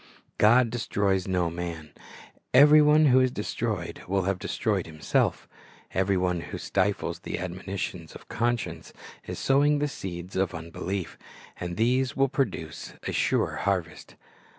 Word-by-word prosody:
God 115 +2 +5
destroys 100 -5 0
no 90 -3 0
man. 85 -3 -6 0.6
Every 150 +2 +8
one 150 +1 +5
who 130 -2 +6
is 130 0 +3
destroyed 105 -5 -3
will 95 +1 +1
have 95 0 -1
destroyed 100 -4 -1
himself 80 -1 0 0.5
Every 95 +1 +1
one 90 -2 0
who - - -7
stifles 100 +1 -1
the - - -5
admonitions 90 -2 -5
of - - -12
conscience 115 -8 -2 0.3
is - - -5
sowing 145 +2 +3
the 145 0 0
seeds 90 -8 -7
of 95 -1 0
unbelief, 85 +3 -5 0.4
and 90 0 -4
these 125 +1 +1
will 135 0 +3
produce 90 - -3
a - - -3
sure - - +1
harvest. 90 -5 -2
95 Hz, 140 wpm, -27 LUFS, 90-120 Hz, 0.6 s, Every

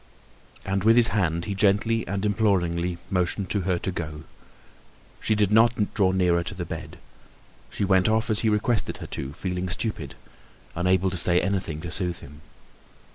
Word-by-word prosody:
And 95 0 -1
with 115 +1 +5
his 120 -1 +8
hand 85 -5 0
he 100 - -3
gently 105 +3 +1
and 100 +1 -2
imploringly 90 -5 0
motioned 90 +1 -1
to 100 - 0
her 90 - +2
to 95 - -3
go. 75 -3 -6 1.0
She 110 - +1
did 105 -1 +1
not 110 -1 +3
draw 95 -3 +2
nearer 90 -2 +2
to 95 - -6
the 90 -2 -5
bed. - - -7 0.7
She 100 - -2
went 95 0 +3
off 110 +1 +1
as 105 - +1
he 110 - +1
requested 105 +2 0
her - - -8
to, 70 +1 -5
feeling 90 +2 -4
stupid, 90 - -3 0.6
unable 90 +1 +1
to 95 - -3
say 85 +1 +3
anything 95 -6 -2
to 85 -1 -6
soothe 90 -2 -1
him. 75 +2 -13
95 Hz, 175 wpm, -25 LUFS, 85-105 Hz, 1.0 s, his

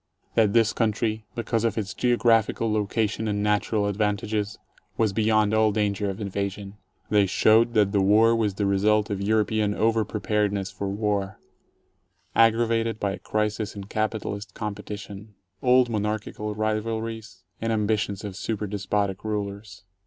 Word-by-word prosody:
That 105 -3 +3
this 115 -2 +3
country, 110 0 -1
because 115 -1 -1
of 115 -2 0
its 100 -3 -3
geographical 115 -2 +2
location 110 +1 -1
and 105 -1 -1
natural 105 0 +1
advantages, 105 0 -1 0.4
was 110 -3 +1
beyond 110 0 +2
all 110 0 +4
danger 100 -1 0
of 95 - -5
invasion. 100 0 -4 0.3
They 105 -2 +4
showed 115 +5 +4
that 105 -2 +4
the 100 -1 +2
War 110 +4 +5
was 105 -4 0
the 100 - -1
result 105 +2 +2
of 100 -1 -2
European 105 0 +1
over 115 0 +2
preparedness 105 -2 -1
for 100 - -4
war, 100 -1 -2 1.0
aggravated 115 0 +3
by 100 - 0
a - - -6
crisis 105 0 -2
in 100 - -6
capitalist 105 -1 -3
competition, 105 0 -7 0.3
old 125 0 +4
mon 110 -3 -1
archical 105 0 -3
rivalries 110 +1 -3 0.2
and 115 0 -1
ambitions 105 -2 0
of 100 -3 -6
super 105 +1 -3
despotic 100 -1 -2
rulers. 105 -1 -5
105 Hz, 145 wpm, -25 LUFS, 100-110 Hz, 1.0 s, War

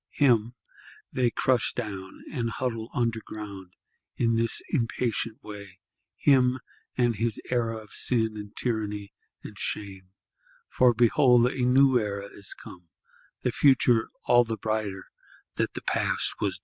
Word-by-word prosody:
Him 120 -4 +3 0.6
they 125 -2 +2
crush 125 0 +1
down, 100 -5 -6
and 115 -2 -1
huddle 115 -1 -3
under 115 -2 -1
ground, 100 -4 -9 0.4
in 115 -1 +2
this 115 0 +2
impatient 115 - -1
way; 100 -3 -10 0.4
him 130 -2 +4 0.4
and 120 -3 +2
his 115 0 -1
era 115 -2 0
of 110 -2 -12
sin 110 -3 +1
and 105 -1 -8
tyranny 105 -4 -3 0.3
and - - -10
shame; 95 -2 -5 0.6
for 125 -2 +4
behold 120 +1 +5
a 125 0 0
New 130 0 +5
Era 100 -2 -3
is 100 - -9
come; 90 -3 -13 0.5
the - - +1
future 125 -5 +4 0.2
all 120 0 +6
the 115 -1 -4
brighter 105 -3 -2 0.5
that - - -1
the - - -6
past - - +1
was - - 0
base. - - -24
115 Hz, 140 wpm, -27 LUFS, 105-125 Hz, 0.6 s, all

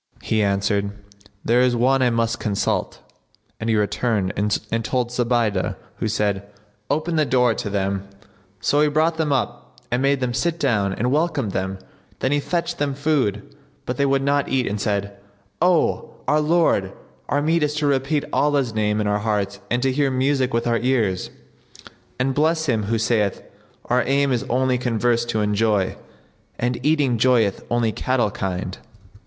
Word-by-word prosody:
"[FN#70] - - -26
He 110 -1 +1
answered, 100 0 +1 0.5
"There 120 +2 +4
is 125 -1 +3
one 130 +3 +3
I 125 - +4
must 115 0 0
consult;" 100 -2 -1 0.6
and 115 - -2
he 110 - +3
returned 105 -1 0
and 105 +2 -1
told 125 0 -1
Zubaydah 120 -5 0 0.2
who - - -2
said, 100 -2 -1 0.4
"Open 155 +4 0
the 155 - +4
door 125 -2 +3
to 105 - -4
them." 100 -1 -2 0.5
So 145 +7 +2
he 150 - +4
brought 160 +2 +1
them 155 -2 0
up 125 -1 -3
and 125 +1 +1
made 140 0 +2
them 125 -2 -1
sit 170 +5 -1
down 105 - +1
and 120 +6 -1
welcomed 150 - 0
them; 95 0 -2 0.4
then 130 - -1
he 145 - +2
fetched 170 +3 -2
them 145 -2 -1
food, 135 -9 0 0.4
but 125 - -3
they 140 - +2
would 135 0 +2
not 140 0 +1
eat 130 -2 +1
and 105 0 -3
said, 100 -1 -1 0.5
"O 175 -3 +2
our 150 +2 +3
lord, 150 - +2 0.4
our 145 0 +1
meat 165 +2 +2
is 150 0 0
to 150 -1 -1
repeat 140 +1 +1
Allah's 140 -5 +1
name 105 -1 0
in - - -1
our 105 0 +1
hearts 105 -2 -1
and 120 +1 0
to 135 - +2
hear 140 +1 +1
music 130 0 +1
with 115 -1 0
our 115 -1 +1
ears: 115 -7 0 0.9
and 130 +1 0
bless 160 +3 +1
him 115 -7 0
who 115 +2 0
saith, 110 -3 0 0.4
'Our 125 +1 +2
aim 140 +1 +2
is 120 -2 0
only 130 0 +1
converse 120 -1 +1
to 115 -2 -1
enjoy, 105 -2 +1 0.3
* - - -37
And 125 0 -2
eating 145 -6 +2
joyeth 115 -5 +2
only 120 -1 +1
cattle 120 -2 0
kind.' 95 -1 -4
120 Hz, 175 wpm, -22 LUFS, 105-140 Hz, 0.9 s, There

